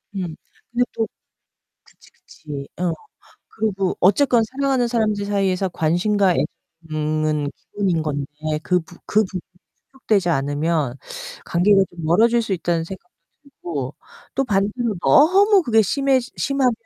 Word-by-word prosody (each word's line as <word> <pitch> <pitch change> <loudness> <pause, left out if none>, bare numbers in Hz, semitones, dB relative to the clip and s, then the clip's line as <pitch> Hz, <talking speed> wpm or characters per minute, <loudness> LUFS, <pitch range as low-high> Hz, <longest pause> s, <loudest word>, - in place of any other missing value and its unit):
음. 175 -4 -4 0.4
근데 245 +1 +2
또 225 - 0 0.8
그치, - - -22
그치. 140 -3 -9
어. 175 -2 +1 0.6
그리고 195 -4 -1
어쨌건 230 +4 +4
사랑하는 265 -2 +1
사람들 215 -4 0
사이에서 195 -2 0
관심과 180 +4 +2 0.5
애정은 155 -1 -1
기본인 185 -6 -1
건데 145 -2 -2 0.4
그 180 -1 +2
부 170 +1 -13
그 215 +1 +3
부분이 185 -2 -5 0.5
충족되지 210 -9 0
않으면 145 -1 0 0.5
관계가 195 +3 +4
좀 175 -1 -10
멀어질 230 +8 +4
수 215 -3 -2
있다는 170 -2 -1
생각도 180 -1 -10 0.3
들고 150 - -6 0.4
또 270 - +2
반대로 210 +2 0
너무 380 - +5
그게 225 -4 +4
심해지 265 +3 +1
심하면 275 -3 +2
195 Hz, 285 characters per minute, -21 LUFS, 165-235 Hz, 0.8 s, 너무